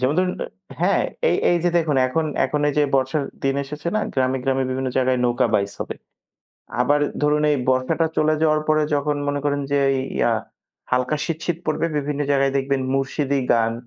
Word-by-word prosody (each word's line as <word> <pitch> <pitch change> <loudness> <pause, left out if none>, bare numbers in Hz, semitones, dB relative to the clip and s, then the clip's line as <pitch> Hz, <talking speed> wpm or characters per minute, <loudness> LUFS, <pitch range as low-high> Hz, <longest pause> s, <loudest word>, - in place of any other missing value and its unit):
যেমন 130 +4 +1
ধরুন 185 0 +2 0.5
হ্যাঁ - - +3 0.3
এই - - +2
এইযে 175 0 +2
দেখুন 155 -4 +1
এখন 160 +5 0 0.2
এখন 150 - -1
এই - - 0
যে - - +5
বর্ষার 135 +2 +1 0.2
দিন 135 0 +2
এসেছে 150 +4 -5
না - - +2
গ্রামে, 130 0 +1
গ্রামে 135 -1 +1
বিভিন্ন 130 0 -1
জায়গায় 130 -1 +2
নৌকা 120 +1 +2
বাইস 100 0 +1
হবে। - - -4 0.9
আবার 145 +4 +3 0.2
ধরুন 150 0 +3
এই 145 - +3
বর্ষাটা 130 +5 +1
চলে 155 0 +3
যাওয়ার 155 -1 +3
পরে 155 0 +3
যখন 145 +1 0
মনে 145 0 -1
করেন 145 0 0
যে 145 - +3 0.4
ইয়া 120 - +3 0.6
হালকা 125 +4 +1
শীত, 165 -2 -3
শীত 175 -2 -1
পড়বে 155 +1 0
বিভিন্ন 145 0 -3
জায়গায় 135 -1 +2
দেখবেন 135 0 0
মুরশিদি 135 +1 0
গান, 115 -1 +2
140 Hz, 180 wpm, -22 LUFS, 130-150 Hz, 0.9 s, যে